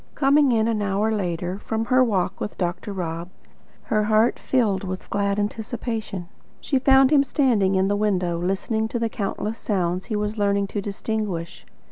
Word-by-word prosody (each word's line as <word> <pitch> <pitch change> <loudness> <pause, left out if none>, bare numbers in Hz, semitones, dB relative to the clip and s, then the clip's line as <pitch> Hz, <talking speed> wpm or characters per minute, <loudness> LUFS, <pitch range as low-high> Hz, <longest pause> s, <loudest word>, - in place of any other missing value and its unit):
Coming 280 -1 +4
in, 225 -1 +2
an 220 -2 0
hour 205 +2 0
later, 180 -2 -2
from 225 +1 -2
her 255 +1 +4
walk 190 -5 0
with 210 - -4
Dr. 180 +2 -3
Rob, 170 -2 -4 0.5
her 215 -1 +1
heart 215 +2 +3
filled 215 -8 +1
with 185 -1 -5
glad 200 0 0
anticipation, 220 -3 -4 0.3
she 270 - 0
found 265 +1 +5
him 285 -2 +6
standing 230 -10 +2
in 190 0 +2
the 205 - +1
window, 185 -5 0
listening 195 +5 -1
to 235 - -3
the 230 -1 0
countless 215 +1 -3
sounds 180 -3 -1
he 220 - -3
was 210 +1 -2
learning 200 0 +2
to 205 - -3
distinguish. 200 -4 -4
210 Hz, 170 wpm, -23 LUFS, 190-225 Hz, 0.5 s, him